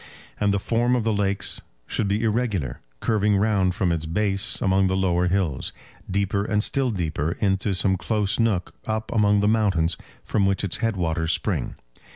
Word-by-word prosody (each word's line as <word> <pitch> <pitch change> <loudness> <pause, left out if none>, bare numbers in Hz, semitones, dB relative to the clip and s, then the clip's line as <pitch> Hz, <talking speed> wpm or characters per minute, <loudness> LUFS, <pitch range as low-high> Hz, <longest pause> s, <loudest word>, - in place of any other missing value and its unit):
And 105 -1 +2
the 100 - +1
form 120 +4 +1
of 120 - 0
the 110 0 +1
lakes 100 -1 0 0.2
should 105 - -1
be 100 +3 0
irregular, 105 - -1 0.2
curving 105 -2 +2
round 95 -3 +2
from 90 -3 +1
its 80 -1 -2
base 95 +3 +1
among 95 0 +2
the 95 - 0
lower 90 -2 +1
hills, 90 -7 -1 0.4
deeper 100 +1 0
and 105 0 0
still 135 +1 +1
deeper 80 -6 -2
into 95 0 +1
some 95 +2 +2
close 105 +2 -1
nook 110 -6 0
up 110 0 -2
among 105 -2 +3
the 105 - +2
mountains 95 -7 +2 0.3
from 100 -3 +1
which 95 +1 0
its 100 - 0
head 115 -2 0
waters 80 -2 0
spring. - - -2
100 Hz, 180 wpm, -24 LUFS, 90-105 Hz, 0.4 s, among